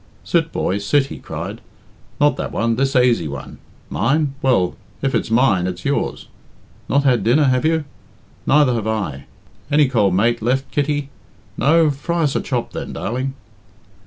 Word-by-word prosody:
"Sit, - - +1
boy, 95 +2 -1
sit," 135 +8 +2
he - - -9
cried; - - -6 0.6
"not 145 0 +4
that - - -4
one 115 0 0
this 135 +2 0
aisy 120 -9 +3
one. 70 -2 -8 0.3
Mine? 140 +5 0
Well, 120 -10 +2 0.3
if 135 - +1
it's - - 0
mine, 115 -6 +3
it's 90 -1 -6
yours. 140 - -1 0.6
Not 140 0 +3
had 125 -6 +3
dinner, 125 +8 +4
have 130 0 +2
you? 160 -1 +1 0.6
Neither 145 -3 +4
have 110 -2 -2
I. 100 -11 -3 0.4
Any 150 -1 +4
cold 105 -8 +2
mate 115 +4 +2
left, 130 +4 0
Kitty? 145 -1 -1 0.4
No? 155 +1 +4
Fry 170 +4 -2
us 145 -3 0
a - - +1
chop, 125 -3 -3
then, - - -5
darling." 130 +5 -3
130 Hz, 160 wpm, -20 LUFS, 110-145 Hz, 0.6 s, not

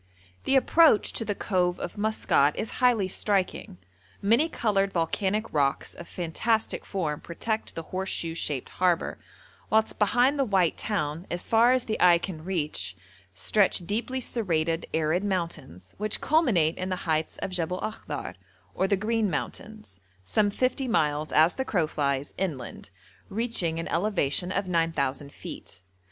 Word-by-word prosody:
The 270 - +3
approach 300 -2 +5
to - - -1
the 205 -2 -2
cove 180 -3 0
of - - -5
Maskat 205 -9 +2
is 220 - -4
highly 240 -6 +4
striking. 190 - -1 0.4
Many 230 +11 +3
coloured 195 -8 +1
volcanic 195 +5 -1
rocks 140 -2 0
of 170 - -10
fantastic 215 +6 -1
form 160 -7 -2
protect 220 +6 -3
the 165 - -4
horseshoe 185 -2 -3
shaped 145 -5 -3
harbour, 180 -1 0 0.5
whilst 220 0 +2
behind 245 +7 +3
the - - +4
white 190 -8 +2
town, 165 -4 -2
as 175 - -3
far 230 +2 +5
as 255 -1 +2
the 215 - -2
eye 175 -1 +7
can 170 -2 -6
reach, 165 -4 -2 0.4
stretch 195 -4 +2
deeply 235 +7 -2
serrated, 165 -9 -1
arid 160 +4 +1
mountains, 155 - -4
which 215 0 0
culminate 215 - +2
in 185 +1 -2
the 185 -1 -4
heights 155 -1 0
of - - -4
Jebel 180 0 -1
Akhdar, 180 -9 -5 0.4
or 190 - +1
the 200 - +2
'Green 220 +1 0
Mountains,' 215 - -6 0.3
some 205 - +2
fifty 255 +5 0
miles, 150 -8 +1
as 160 +3 +5
the 265 - -2
crow 180 -10 +1
flies, 140 -2 -2
inland, 140 - -4 0.4
reaching 195 -7 0
an 165 - -4
elevation 180 -2 0
of 200 0 -1
9,000 155 -5 0
feet. 90 - -9
185 Hz, 150 wpm, -27 LUFS, 160-215 Hz, 0.5 s, eye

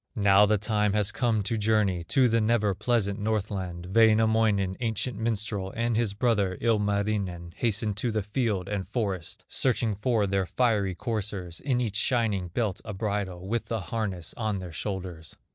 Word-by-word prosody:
Now 100 0 +5
the 105 +1 +3
time 105 0 +1
has 105 -1 +1
come 115 -4 +1
to 115 +2 -1
journey 105 -5 +2
To 130 +4 +3
the 115 -1 +2
never 110 -2 +2
pleasant 105 -1 0
Northland; 95 -4 -3
Wainamoinen, 110 -3 +4
ancient 115 0 -2
minstrel, 105 -4 -2
And 115 0 0
his 110 -3 0
brother, 105 -5 +1
Ilmarinen, 100 -5 0
Hasten 110 -2 0
to 105 +4 -2
the 110 -2 -1
field 105 -3 -1
and 100 -3 -3
forest, 100 -7 -3
Searching 120 -4 +1
for 105 +1 +1
their 95 -1 0
fiery 105 -7 +1
coursers, 100 -6 -3
In 130 -3 0
each 110 -5 -1
shining 110 -6 +1
belt 100 +2 -2
a 105 -3 -6
bridle, 95 -3 -3
With 115 +3 -2
a 115 - 0
harness 95 -3 -4
on 110 -3 -1
their 90 -2 -7
shoulders. 90 -3 -5
105 Hz, 160 wpm, -27 LUFS, 95-115 Hz, -, Now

